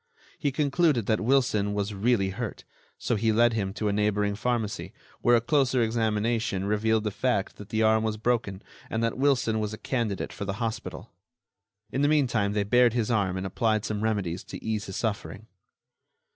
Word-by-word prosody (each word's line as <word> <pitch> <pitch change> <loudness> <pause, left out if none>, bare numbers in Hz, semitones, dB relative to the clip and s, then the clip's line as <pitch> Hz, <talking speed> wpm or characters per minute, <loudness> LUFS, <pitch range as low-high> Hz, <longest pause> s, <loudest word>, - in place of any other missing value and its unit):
He 145 - 0
concluded 145 - +2
that 110 0 +1
Wilson 110 -5 +2
was 100 0 -2
really 100 -1 +1
hurt, 95 - -5 0.3
so 120 - -1
he 110 +1 +1
led 120 +2 +4
him 100 -4 -1
to 105 - -1
a 100 - +1
neighboring 105 0 +1
pharmacy, 105 -4 -2 0.3
where 120 - +5
a 115 - +3
closer 130 -1 +2
examination 110 -2 0
revealed 110 +1 +1
the 105 - -1
fact 105 -1 -1
that 105 0 -10
the 110 0 +1
arm 110 0 +4
was 110 -1 -1
broken 110 -4 -1 0.3
and 110 +1 -1
that 115 - 0
Wilson 125 -5 +2
was 105 0 -2
a - - -14
candidate 115 -7 -2
for 100 - -5
the 100 - -2
hospital. 115 +1 -5 0.8
In 135 - -1
the 145 - +4
meantime 120 -9 +2
they 105 -1 +1
bared 120 +3 +4
his 120 -1 0
arm 95 -5 +1
and 95 - -3
applied 110 +2 0
some 105 -1 -2
remedies 100 -5 -1
to - - -9
ease 110 -2 -1
his 95 - -6
suffering. 110 -1 -3
110 Hz, 185 wpm, -27 LUFS, 105-120 Hz, 0.8 s, where